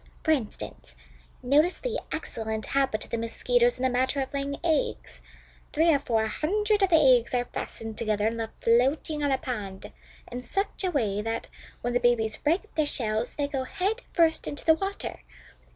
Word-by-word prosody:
For 315 - +2
instance, 235 - -3 0.5
notice 300 +8 +3
the - - -2
excellent 220 -8 -3
habit 270 -6 0
of - - -15
the 235 - -1
Mosquitoes 480 - +2
in - - -5
the 260 - +4
matter 260 +3 +1
of 265 0 -3
laying 280 0 -2
eggs. 320 -4 -1 0.5
Three 325 +2 +4
or 285 - +3
four 230 -5 +1
hundred 415 - +1
of 390 - +4
the 340 - +5
eggs 255 -6 +5
are 245 0 +1
fastened 225 -2 -6
together 215 -2 0
and 225 +1 0
left 225 -1 -6
floating 270 +6 +2
on 285 - +2
a 265 - +3
pond 205 -8 -5 0.4
in 245 +1 -4
such 390 +9 -3
a 370 - +2
way 215 - 0
that, 225 +1 -3 0.3
when 240 0 -1
the 245 - +3
babies 235 -3 +2
break 345 +8 0
their 310 -2 +1
shells, 225 -3 -2
they 290 -1 0
go 275 -2 -2
head 400 - -2
first 330 -2 +3
into 290 - -4
the 320 - +7
water. 390 +5 -4
270 Hz, 185 wpm, -27 LUFS, 230-320 Hz, 0.5 s, the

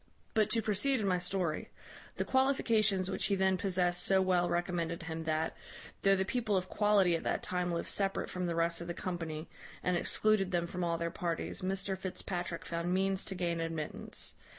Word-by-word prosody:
But 215 -1 +3
to 225 0 +2
proceed 230 +6 +2
in 210 - -1
my 180 -2 +2
story: 180 -3 0 0.5
the - - 0
qualifications 220 -8 +2
which - - 0
he 200 - +2
then 190 0 +3
possessed 180 -2 +2
so 190 -1 +4
well 180 -2 +2
recommended 170 -1 -1
him, 165 0 -5
that, 160 0 0 0.5
though 195 0 +5
the 190 0 0
people 220 -2 0
of 185 0 -2
quality 205 -4 +3
at 165 - -2
that - - -1
time 180 -1 -1
lived 170 - -2
separate 195 -1 +1
from 180 -1 -3
the 170 - -1
rest 170 +1 +1
of 170 - -6
the 175 - -4
company, 165 -3 -4 0.4
and 180 - +1
excluded 205 +2 +3
them 175 -2 0
from 180 +1 -4
all 170 -1 0
their 170 0 -2
parties, 170 -1 -3
Mr 190 +1 -1
Fitzpatrick 180 -2 -4
found 170 +1 -2
means 190 +1 +1
to 190 - -3
gain 170 -2 -1
admittance. 165 -2 -3
180 Hz, 195 wpm, -33 LUFS, 170-195 Hz, 0.5 s, though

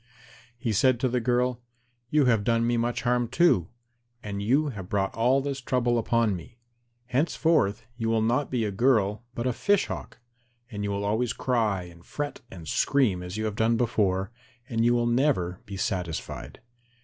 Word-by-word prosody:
He 120 -3 -2
said 130 +4 +3
to 130 - +3
the 125 0 0
girl, 125 +1 0 0.5
"You 150 0 +3
have 115 -4 +3
done 115 +1 +2
me 120 0 +1
much 120 +1 -1
harm 120 -1 +1
too, 130 - +3 0.6
and 100 -1 -4
you 140 +8 +2
have 100 -7 -7
brought 95 -1 0
all 125 +5 +3
this 140 -1 -4
trouble 120 -1 +1
upon 115 -2 +1
me. 90 +7 -11 0.5
Henceforth 135 -3 +1
you 115 -1 -1
will 115 -1 +2
be 110 - +1
not 125 +4 0 0.2
a - - -3
girl 110 -1 +2
but 120 - -3
a 125 - +1
Fish 205 - +2
Hawk, - - -7 0.5
and 105 -2 -4
you 100 - -1
will 100 0 -2
always 110 +3 0
cry 110 -7 0
and 85 -1 -14
fret 145 +7 -5
and 85 -4 -10
scream 110 - +2
as 90 +3 -6
you 110 - -2
have 105 -2 -2
done 115 +1 +2
before, 100 -5 0 0.4
and 115 -1 0
you 120 +1 +4
will 120 0 +1
never 120 -8 +1
be 100 -1 -6
satisfied." 90 -4 -4
115 Hz, 185 wpm, -27 LUFS, 100-125 Hz, 0.6 s, you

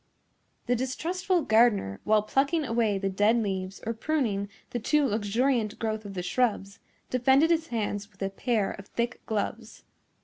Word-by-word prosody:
The 245 - +2
distrustful 340 +8 -1
gardener, 220 - +3
while 215 -1 +4
plucking 285 +7 +1
away 230 -4 +1
the 195 0 -1
dead 205 +4 +3
leaves 190 -3 -2
or 230 - -1
pruning 225 -6 -1 0.2
the 240 - -2
too 295 +6 +2
luxuriant 225 +1 0
growth 220 -1 -3
of 200 -1 -8
the 180 - -3
shrubs, 200 0 -1 0.3
defended 265 +6 +4
his 325 -1 +1
hands 205 -3 -3
with 195 0 -8
a 195 - -1
pair 215 0 0
of 195 -1 -10
thick 235 +1 -3
gloves. 220 +1 -3
225 Hz, 160 wpm, -28 LUFS, 205-255 Hz, 0.3 s, while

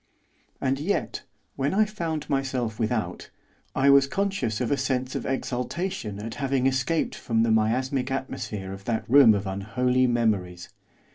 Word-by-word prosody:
And 135 0 0
yet, 180 +8 -2 0.3
when 140 +7 -1
I 215 +1 +5
found 170 -7 -4
myself 130 -5 -1
without, 110 -1 -2 0.5
I 140 +1 +5
was 140 0 +6
conscious 195 - -1
of 125 0 -1
a - - +4
sense 130 -1 -1
of - - -3
exultation 130 - -3
at 110 +2 -6
having 135 -1 +1
escaped 135 +5 +1
from 115 -2 0
the 115 - +2
miasmic 125 +5 +1
atmosphere 105 -7 -4
of 95 0 -10
that 115 -2 -2
room 130 -4 +7
of 100 0 -2
unholy 125 +7 +1
memories. 100 -7 0
130 Hz, 150 wpm, -26 LUFS, 110-140 Hz, 0.5 s, room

